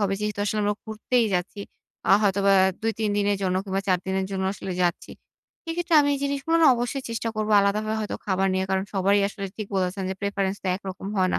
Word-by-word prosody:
হবে। 195 -1 +1
যেহেতু 210 -1 -2
আসলে 210 +1 -1
আমরা 205 0 +1
ঘুরতেই 225 +2 0
যাচ্ছি। 185 +3 -2 0.5
আ - - +4
হয়তোবা 200 0 +3 0.3
২-৩ 225 -1 -1
দিনের 205 0 +2
জন্য 185 -1 +1
কিংবা 195 -1 -1
৪ 185 -1 +3
দিনের 190 0 -1
জন্য 190 -1 -2
আসলে 195 -2 -6
যাচ্ছি। 175 -1 -1 0.5
সেইক্ষেত্রে 340 0 -1
আমি 285 - +2
এই - - -3
জিনিসগুলো 280 +4 0
না - - +7
অবশ্যই 245 +3 -3
চেষ্টা 230 0 -2
করবো 215 0 0
আলাদাভাবে 215 +2 0
হয়তো 210 - -3
খাবার 195 -1 +1
নিয়ে। 190 0 0
কারণ 190 0 +1
সবারই 200 +1 +3
আসলে 200 -1 -6
ঠিক 215 - -5
বলেছেন 190 +1 -1
যে - - -2
প্রেফারেন্স 200 -1 -1
তো - - -5
একরকম 190 0 -7
হয় 185 -1 +3
না। - - +2
200 Hz, 210 wpm, -25 LUFS, 190-220 Hz, 0.5 s, না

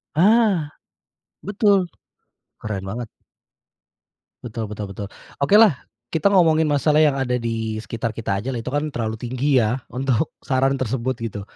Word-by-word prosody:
Ah, 200 -3 +4 0.8
betul, 205 0 +3 0.8
keren 105 -3 -4
banget. 120 +1 -5 1.4
Betul 115 -2 -4
betul 105 -1 -6
betul. 100 +1 -6 0.3
Okelah, 200 +2 +5 0.3
kita 160 +3 +1
ngomongin 160 -4 +4
masalah 150 +1 +2
yang 155 -2 +5
ada 130 -2 -1
di 115 -2 -3
sekitar 115 +1 -4
kita 105 -3 -3
ajalah, 125 +2 -3
itu 115 +2 -5
kan 145 +1 0
terlalu 115 -5 -3
tinggi 130 +2 +1
ya 110 +3 0 0.2
untuk 130 +2 0
saran 135 0 +1
tersebut, 130 +1 -1
gitu. 105 -3 -4
130 Hz, 135 wpm, -22 LUFS, 115-155 Hz, 1.4 s, Okelah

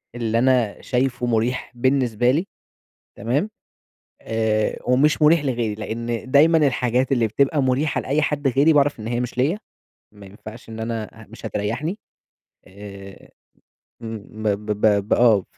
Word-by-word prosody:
اللي 115 -1 0
أنا 125 -5 +1
شايفه 125 -1 -1
مريح 120 +1 -1
بالنسبة 125 -2 +2
لي، 170 +8 -1 0.7
تمام، 140 - -1 0.7
آآ 110 -1 -1
ومش 135 +6 +2
مريح 150 0 +4
لغيري، 115 -5 -1
لأن 115 +3 -5
دايمًا 160 +4 +5
الحاجات 125 +1 0
اللي 120 -4 +2
بتبقى 140 +6 +1
مريحة 135 +4 0
لأي 145 +4 0
حد 145 -1 0
غيري 140 +5 +4
باعرف 145 -3 +2
إن 110 - -6
هي 120 0 -1
مش 125 0 -4
ليّا، 155 +11 +1 0.5
ما 100 -1 -14
ينفَعش 110 +4 -12
إن 110 0 -8
أنا 115 -1 -3 0.2
أ - - -15
مش 115 0 -9
هتريحني، 115 - -3 0.7
آآ. 100 0 -12 0.7
امم، 115 -1 -5 0.3
ب - - 0
ب 105 +1 -2
ب 100 -1 +3
ب - - +2
آه، 110 -6 +4
120 Hz, 150 wpm, -22 LUFS, 110-135 Hz, 0.7 s, دايمًا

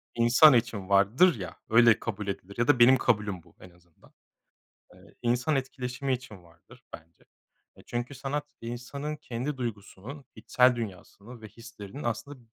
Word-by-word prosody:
insan 120 +6 +6
için 115 -5 -1
vardır 105 - +4
ya, 90 - -7
öyle 115 0 +5
kabul 105 -2 -5
edilir 100 0 -6
ya 120 - +1
da 125 - +4
benim 130 +2 +7
kabulüm 105 -8 -1
bu - - -24
en 90 - -14
azından. 85 -2 -25 0.8
Eee, - - -20
insan 125 +5 +1
etkileşimi 130 0 -3
için 110 -7 -10
vardır 85 -1 -20
bence. 80 +1 -14 0.5
E, - - -16
çünkü 120 +3 -4
sanat 140 +2 -4
insanın 125 +6 -6
kendi 135 0 -5
duygusunun, 120 +3 -7
içsel 125 -1 +2
dünyasını 110 +2 -9
ve 110 - -9
hislerinin 115 +2 -11
aslında 120 +5 -4
120 Hz, 150 wpm, -27 LUFS, 100-130 Hz, 0.8 s, benim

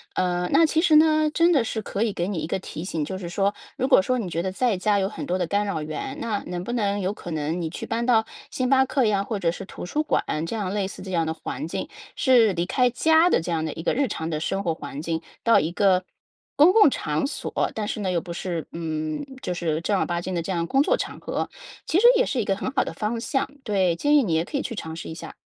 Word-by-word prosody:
呃， 180 -1 0
那 320 +4 +6
其 315 +1 +2
实 320 -3 +5
呢， 310 0 +4
真 340 +2 +4
的 275 -6 +3
是 220 -1 -3
可 200 0 -2
以 225 - 0
给 175 -2 -2
你 195 -4 -2
一 155 - -3
个 185 - -1
提 165 -3 -7
醒， 165 -5 -2
就 190 - -5
是 180 -2 -6
说 195 +3 +1 0.2
如 260 - 0
果 270 - +6
说 255 +6 0
你 200 -6 -3
觉 170 0 -1
得 190 +1 -2
在 235 +2 +1
家 205 +2 +2
有 190 - +1
很 210 - -6
多 180 +1 0
的 175 - 0
干 205 +3 +1
扰 195 -6 -2
源， 155 - -5
那 220 -3 -2
能 180 0 -4
不 240 - -3
能 205 -4 0
有 190 +1 -1
可 175 - -8
能 160 +3 -2
你 160 - -2
去 165 - -6
搬 230 +1 -2
到 225 -3 +4 0.3
星 255 -1 -1
巴 265 -1 +5
克 265 -1 +1
呀？ 200 -2 +2
或 210 0 -3
者 170 -3 +1
是 185 - -7
图 190 - -8
书 295 +12 -1
馆 - - +1 0.2
这 165 - -5
样 200 -4 -2
类 205 -2 0
似 - - -10
这 190 0 -7
样 165 -2 +1
的 160 - -1
环 160 - -5
境？ 165 - -4 0.3
是 245 -6 +5
离 175 -1 -1
开 250 +6 +2
家 320 +7 +4
的 - - +3
这 170 +1 -3
样 160 -1 0
的 160 - -2
一 160 - -7
个 - - +1
日 270 -1 +1
常 160 -4 -3
的 155 -2 -2
生 195 +4 -1
活 165 -2 0
环 145 -2 -7
境 165 0 -2 0.2
到 230 - +6
一 160 - -2
个 185 0 +3 0.5
公 305 +5 +7
共 420 -10 +6
场 150 - -1
所， 280 - -2
但 210 -1 -3
是 215 - -3
呢， 190 -2 -1
又 170 - 0
不 175 - -8
是 170 -2 -4
嗯， 155 - -3 0.2
就 180 - -2
是 165 -2 -1
正 200 +3 +1
儿 - - +1
八 175 -1 -2
经 185 +1 -4
的 170 - 0
这 190 - -4
样 170 -2 -1
工 270 +7 +3
作 - - +3
场 - - -5
合， - - -3 0.4
其 325 - +2
实 470 - +3
也 - - +3
是 265 - -1
一 220 - 0
个 195 - +1
很 200 - -3
好 275 - +2
的 - - -6
方 225 +2 -2
向。 265 +3 -1
对， 190 -6 +1
建 290 - +2
议 295 - +6
你 180 -8 -1
也 160 +1 +1
可 290 - -3
以 - - -1
去 235 - -5
尝 160 -5 -6
试 165 - -7
一 160 - -6
下。 160 - -9
195 Hz, 310 characters per minute, -24 LUFS, 170-245 Hz, 0.5 s, 公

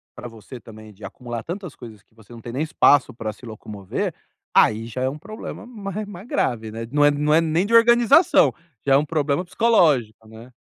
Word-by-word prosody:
pra 125 - -8
você 115 +3 -12
também, 110 -1 -14
de 100 +2 -18
acumular 120 +3 -7
tantas 180 -2 -7
coisas 110 -5 -12
que - - -37
você 110 0 -20
não 115 - -11
tem 120 +1 -8
nem 135 - -2
espaço 145 -3 +3
pra 110 -2 -5
se 125 - -16
locomover, 105 -3 -5 0.4
aí 110 +1 +3
já 120 +2 -6
é 130 - +1
um 145 +3 -8
problema 215 +7 -9
mais 210 -3 -6
mais 200 -1 -10
grave, 110 - -2
né? 115 +1 -7
Não 145 +1 +2
é 145 - +5
não 150 +1 0
é 160 - +5
nem 165 +3 0
de 225 - -4
organização, 240 - +5 0.3
já 135 - +3
é - - +7
um 145 - 0
problema 150 +1 -1
psicológico, 160 - +1
né. 115 +3 -14
135 Hz, 215 wpm, -22 LUFS, 115-180 Hz, 0.4 s, é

